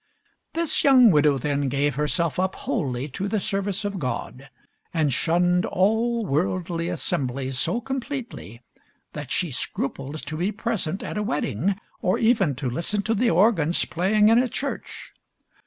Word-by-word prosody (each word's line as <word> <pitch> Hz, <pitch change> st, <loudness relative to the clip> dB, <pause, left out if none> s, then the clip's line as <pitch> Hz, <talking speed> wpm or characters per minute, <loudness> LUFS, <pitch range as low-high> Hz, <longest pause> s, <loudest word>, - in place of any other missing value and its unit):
This 335 Hz, -1 st, +1 dB
young 255 Hz, -5 st, +7 dB
widow, 150 Hz, -3 st, +4 dB
then, 140 Hz, +1 st, -1 dB
gave 140 Hz, +2 st, +1 dB
herself 155 Hz, +4 st, 0 dB
up 190 Hz, 0 st, 0 dB
wholly 140 Hz, -, -2 dB
to 190 Hz, +9 st, -4 dB
the 215 Hz, +1 st, 0 dB
service 200 Hz, +1 st, -2 dB
of 200 Hz, -2 st, -3 dB
God, 135 Hz, 0 st, -5 dB, 0.4 s
and 155 Hz, -5 st, +1 dB
shunned 175 Hz, +5 st, +2 dB
all 225 Hz, +4 st, +1 dB
worldly 170 Hz, +2 st, -1 dB
assemblies 130 Hz, -6 st, -2 dB
so 235 Hz, -, +1 dB
completely 245 Hz, -, -6 dB, 0.5 s
that -, -, -6 dB
she 175 Hz, -4 st, -1 dB
scrupled 135 Hz, +3 st, -4 dB
to 155 Hz, -, -5 dB
be 180 Hz, +5 st, 0 dB
present 210 Hz, -5 st, -3 dB
at -, -, -4 dB
a -, -, 0 dB
wedding, 165 Hz, -, -1 dB, 0.3 s
or 185 Hz, -3 st, +1 dB
even 220 Hz, -, +2 dB
to 135 Hz, +1 st, -3 dB
listen 170 Hz, -, -1 dB
to 225 Hz, -, 0 dB
the 230 Hz, +2 st, +2 dB
organs 175 Hz, -3 st, +3 dB
playing 210 Hz, +5 st, +3 dB
in 230 Hz, +1 st, +6 dB
a 250 Hz, 0 st, +1 dB
church. 280 Hz, +5 st, -5 dB
180 Hz, 155 wpm, -24 LUFS, 145-215 Hz, 0.5 s, young